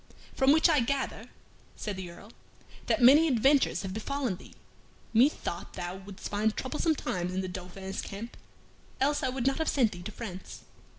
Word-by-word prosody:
"From 265 +1 +4
which 315 +3 +6
I 310 -4 +4
gather," 265 +3 -2 0.5
said 210 -2 -4
the 185 -2 -6
Earl, 200 +6 -13 0.5
"that - - +2
many 290 +6 +8
adventures 270 0 +3
have 190 -1 -4
befallen 245 -1 -2
thee. - - -15 0.6
Methought 220 - +1
thou 175 +1 -5
wouldst 195 0 -8
find 215 +1 0
troublesome 310 +4 0
times 180 -7 -3
in 190 - 0
the 185 - -3
Dauphin's 185 +1 -6
camp, 215 +4 -7 0.6
else 290 +3 +2
I 265 - 0
would 255 -1 -3
not 270 +2 +2
have 320 - +1
sent 240 -6 +3
thee 175 - -8
to 190 - -6
France." 190 -5 -8
220 Hz, 175 wpm, -29 LUFS, 190-275 Hz, 0.6 s, many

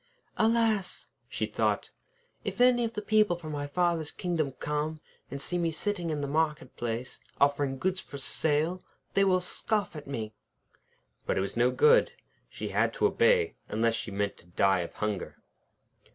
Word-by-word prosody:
}] - - -46
'Alas!' 220 -3 +1 0.2
she - - -1
thought, - - -1 0.5
'if - - -4
any 245 -1 +5
of 230 0 -2
the 210 - -4
people 215 -3 +3
from 160 -3 -7
my 145 -1 -3
father's 170 0 +1
kingdom 165 -6 -1
come 150 +3 -2 0.3
and 140 - -5
see 175 +5 -1
me 170 -1 +1
sitting 175 +2 -1
in 150 -2 -1
the 140 - -2
market 150 0 -1
place, 120 +1 -4 0.2
offering 140 -1 +2
goods 185 +6 0
for 140 - -8
sale, 155 +5 0 0.3
they 195 - +4
will 185 -2 +4
scoff 205 +1 -1
at 150 -2 -8
me.' 110 -6 -4 0.9
But - - +1
it - - +2
was 95 - -3
no 120 +1 +4
good. 455 - +5 0.4
She - - -5
had - - +1
to - - +1
obey, 465 -2 +3 0.2
unless 115 +1 +2
she 115 0 -3
meant 100 0 -2
to 85 - -18
die 95 +2 +2
of 85 - -5
hunger. 105 -3 -3
155 Hz, 175 wpm, -29 LUFS, 135-195 Hz, 0.9 s, any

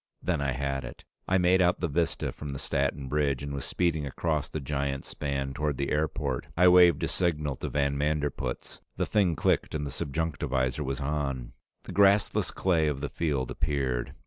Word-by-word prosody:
Then 85 -5 0
I 70 -2 0
had 70 0 -2
it. - - -10 0.2
I 95 - +3
made 90 +1 +4
out 90 0 +3
the 90 - 0
vista 80 +2 -1
from 75 -2 -7
the - - -4
Staten 70 0 -1
Bridge, 70 -1 0
and 70 0 -4
was 70 - -4
speeding 85 -4 0
across 75 +1 -1
the 80 - -4
giant 70 -1 -2
span 70 -2 -3
toward 75 -1 -1
the 70 - -2
airport. 75 -3 -1
I 90 +1 +7
waved 90 -3 +6
a - - +2
signal 75 -5 0
to - - -4
van 70 -1 0
Manderpootz, 75 -4 -2 0.2
the - - +1
thing 95 -6 +2
clicked, - - +1
and 75 -1 -2
the 70 - -4
subjunctivisor 70 -3 -1
was 70 0 -3
on. 70 -3 -2 0.3
The - - -8
grassless 100 0 +3
clay 85 -5 +1
of 75 -3 -1
the 75 - -2
field 70 -6 -1
appeared. 70 -6 -1
75 Hz, 190 wpm, -28 LUFS, 70-80 Hz, 0.3 s, I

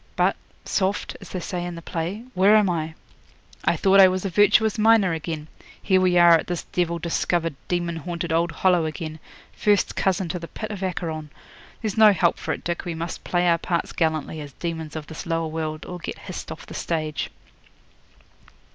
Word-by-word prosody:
"But, - - +2 0.3
soft," 195 +1 -1
as - - -11
they 185 - -4
say 175 0 -4
in 175 -1 -5
the 170 - -8
play, 175 +8 -4
"where 200 +2 +5
am 205 -4 +4
I?" 160 -1 -3 0.7
I - - +3
thought 195 0 +4
I 190 - +10
was 185 +1 -1
a 195 - -1
virtuous 210 +3 +4
miner 215 -5 +5
again. 160 -1 -4 0.3
Here 190 -2 +3
we 180 -1 +3
are 175 -1 +8
at - - -6
this 175 -2 -3
devil 170 -1 -1
discovered, 170 -1 0
demon 175 -1 -1
haunted 170 +1 -3
old 165 +1 +2
Hollow 180 -1 +2
again 155 0 -6 0.3
first 205 -2 +2
cousin 190 -1 +1
to 180 - -3
the 170 - -7
pit 215 +4 -6
of 200 -2 -6
Acheron. 165 -5 -3 0.5
There's 215 -1 -1
no 215 -2 +8
help 170 -2 +2
for - - -3
it, - - -4
Dick. 170 0 -2
We 170 -2 -4
must 165 +1 -5
play 175 0 +1
our 170 -1 +4
parts 170 0 -1
gallantly, 160 -1 -1
as 145 -2 -9
demons 160 -2 -5
of 155 -1 -5
this 160 +2 -8
lower 165 0 0
world, 155 -1 -4
or 180 0 -7
get - - -6
hissed - - -7
off - - -8
the - - -10
stage.' 155 -3 -2
175 Hz, 200 wpm, -24 LUFS, 165-185 Hz, 0.7 s, I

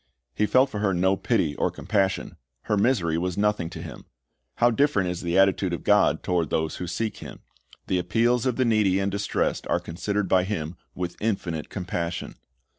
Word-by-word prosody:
He 105 - +1
felt 130 +6 +4
for 105 - -4
her 100 -3 +1
no 95 +2 +3
pity 75 -5 0
or - - +1
compassion; 95 -2 -1 0.3
her 105 - 0
misery 100 -7 +2
was 90 +1 -2
nothing 105 -5 +1
to - - -8
him. - - -9 0.5
How 120 0 +4
different 115 -8 +2
is 90 - -5
the 85 0 0
attitude 95 -1 +3
of 85 - -4
God - - +3
toward 90 -3 0
those 80 0 -1
who 90 - -5
seek 110 +6 -3
Him. - - -10 0.4
The 90 - 0
appeals 115 +7 +1
of 125 - +1
the 130 - +1
needy 105 -5 +3
and 100 0 0
distressed 100 +1 -1
are - - +1
considered 100 +4 -2
by 90 0 +3
Him 90 -4 -3 0.2
with 90 -1 -5
infinite 90 -8 -2
compassion. 90 -3 -4
95 Hz, 190 wpm, -25 LUFS, 90-105 Hz, 0.5 s, felt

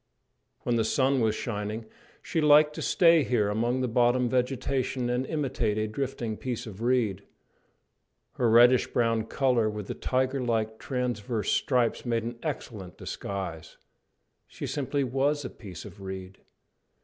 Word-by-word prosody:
When 120 -1 0
the 115 - +2
sun 130 +4 +2
was 110 -1 +2
shining 105 0 -4 0.4
she 165 - -1
liked 150 0 +6
to - - -6
stay 165 -2 +5
here 110 -6 +1
among 120 +5 0
the 130 - 0
bottom 120 +1 +3
vegetation 125 0 -1
and 125 +2 -1
imitate 130 -8 -1
a 110 0 0
drifting 120 -2 -3
piece 125 -1 -4
of 110 -2 -9
reed. 120 -6 +1 1.1
Her 120 -2 +1
reddish 120 +2 +6
brown 115 -2 +1
colour 125 -4 +2
with 105 -1 -5
the - - -4
tiger 130 +1 0
like 110 -2 -1
transverse 120 -4 -2
stripes 125 -4 +1
made 115 -2 0
an 120 +1 -6
excellent 110 - -6
disguise. 90 -5 -6 0.7
She - - -7
simply 145 0 -1
was 135 +3 0
a - - -5
piece 95 -6 -10
of 100 - -11
reed. 95 0 -7
120 Hz, 150 wpm, -28 LUFS, 110-130 Hz, 1.1 s, liked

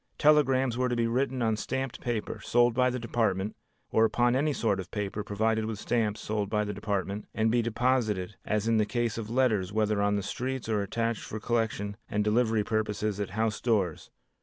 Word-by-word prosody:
Telegrams 135 -5 +3
were 125 0 +2
to 120 - 0
be 115 -1 +1
written 125 +1 0
on 110 -1 +2
stamped 130 +4 -3
paper, 120 -4 -3
sold 120 0 +3
by 125 +1 +3
the 125 - -2
Department, 110 -4 -1 0.4
or 110 - +4
upon 120 +2 +3
any 150 +3 +2
sort 110 -8 0
of 95 -1 -6
paper 105 0 -3
provided 110 +2 0
with 110 -1 -3
stamps 110 -1 -1
sold 105 -2 -2
by 105 0 +1
the 105 0 -3
Department, 100 0 -3
and 110 0 +2
be 120 0 +3
deposited 115 -4 0
as 105 0 -1
in 115 -1 +3
the 105 - +3
case 120 -1 -1
of 110 -1 -6
letters 110 -7 +1
whether 105 -1 +1
on 105 0 +2
the 100 - -1
streets 130 +5 -3
or 110 -2 +1
attached 115 +3 -1
for 110 - -6
collection 110 -3 -1
and 105 -1 0
delivery 110 0 +2
purposes 105 -1 -1
at 100 - -2
house 110 -1 -1
doors. 100 -9 0
110 Hz, 200 wpm, -29 LUFS, 105-120 Hz, 0.4 s, or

